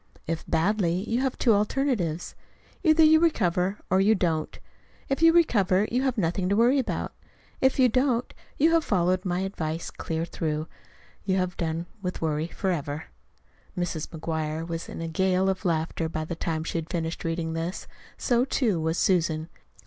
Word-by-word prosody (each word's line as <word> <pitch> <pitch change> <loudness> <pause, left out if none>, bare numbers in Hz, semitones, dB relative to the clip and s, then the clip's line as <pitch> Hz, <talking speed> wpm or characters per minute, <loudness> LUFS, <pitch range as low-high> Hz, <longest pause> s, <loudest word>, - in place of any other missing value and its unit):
If 165 0 -4
badly, 185 +1 +1
you 235 +3 0
have 265 -1 -1
two 235 - +4
alternatives: 205 - 0 0.5
either 320 -1 +5
you 315 0 +7
recover 195 - +1
or 190 +1 +4
you 215 +3 +4
don't. 165 -5 -1 0.5
If 275 +3 -1
you 330 0 +7
recover, 210 - +3
you 250 +2 +1
have 260 -2 0
nothing 180 0 0
to 200 - +2
worry 245 +5 +4
about. 260 - -3 0.5
If 265 0 +3
you 260 -2 +6
don't, 250 0 +1 0.3
and 320 +3 +5
have 330 -1 +3
followed 185 - +1
my 180 0 0
advice 165 -4 -3
clear 165 0 -3
through, 155 -2 -3 0.6
you 190 -1 +1
have 185 -1 -1
done 165 0 -2 0.2
with 180 -1 -4
worry 155 0 -1
forever. 160 -5 -3 0.7
Mrs. 170 -3 -2
McGuire 160 -1 -3
was 165 -1 -5
in - - -6
a 165 - -3
gale 190 +3 +1
of 190 -1 -2
laughter 160 -1 0
by 155 -1 -3
the 170 - -4
time 160 -1 -2
she 165 - -2
had 165 +1 -7
finished 165 -2 -3
reading 165 0 -2
this; 165 +3 -4 0.3
so, 245 -2 +2
too, 230 -8 +1
was 160 +2 0
Susan. 165 -3 +1
180 Hz, 170 wpm, -26 LUFS, 165-225 Hz, 0.7 s, you